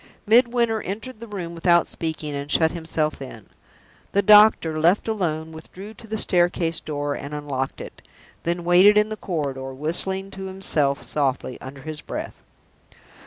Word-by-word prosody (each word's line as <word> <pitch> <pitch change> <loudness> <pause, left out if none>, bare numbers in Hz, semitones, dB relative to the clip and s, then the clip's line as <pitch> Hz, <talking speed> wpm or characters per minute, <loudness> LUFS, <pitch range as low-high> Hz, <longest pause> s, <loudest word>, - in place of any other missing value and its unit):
Midwinter 235 0 +3
entered 215 +5 -6
the 230 - -9
room 180 -5 -6
without 170 0 +3
speaking, 155 -2 -4
and 140 0 -5
shut 160 -1 +3
himself 160 -3 -2
in. 115 -6 -9 0.7
The 200 - +3
doctor, 210 -6 +6
left 175 +8 +3
alone, 160 -7 -2
withdrew 185 +6 -10
to 225 - -14
the 220 +1 -3
staircase 175 -3 +1
door 145 -1 -3
and 145 +1 -6
unlocked 140 -3 -4
it, - - -10 0.4
then 170 +1 -2
waited 185 +4 +6
in 210 0 +3
the 215 - -4
corridor, 135 -9 -4
whistling 190 +6 -2
to 190 0 -7
himself 155 -7 -1
softly, 135 -3 -2
under 135 +1 -9
his 155 -1 -6
breath. - - -6
170 Hz, 155 wpm, -23 LUFS, 150-200 Hz, 0.7 s, doctor